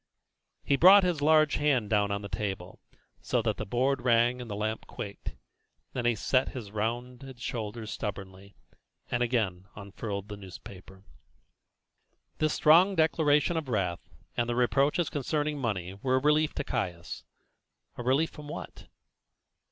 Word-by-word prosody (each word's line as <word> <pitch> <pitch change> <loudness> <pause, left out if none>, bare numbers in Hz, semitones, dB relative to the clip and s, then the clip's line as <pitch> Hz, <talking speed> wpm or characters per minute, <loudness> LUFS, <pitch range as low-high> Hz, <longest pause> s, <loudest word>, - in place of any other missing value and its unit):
He 140 - +2
brought 190 +5 +8
his 175 -5 0
large 155 0 +4
hard - - -4
hand 130 -8 +1
down 105 -1 +3
on 100 0 -3
the - - -5
table, 95 -2 -5 0.4
so - - 0
that - - 0
the - - -5
board 130 +4 +1
rang 120 +1 +3
and 120 - -8
the 100 - -4
lamp 110 +2 -3
quaked; 100 -1 -7 0.6
then 125 -2 -3
he 120 - +2
settled 130 +5 0
his 110 -6 -7
rounded 120 +4 -4
shoulders 110 -2 -5
stubbornly, 100 -1 -6 0.6
and 120 - 0
again 105 -7 0
unfurled 100 0 -6
the 105 -1 -7
newspaper. 95 0 -12 1.4
This 155 -1 +2
strong 175 +6 +5
declaration 160 0 +2
of 155 -5 -3
wrath, 90 -7 -2 0.3
and 120 0 0
the 120 - 0
reproaches 135 +7 +2
concerning 150 +1 -1
the - - -6
money, 95 -6 -2
were 130 -1 +1
a - - +3
relief 150 +2 +2
to - - -2
Caius. 85 -9 -4 0.7
A - - -6
relief 135 +6 +1
from 150 -1 -11
what? - - -8
120 Hz, 155 wpm, -29 LUFS, 100-145 Hz, 1.4 s, brought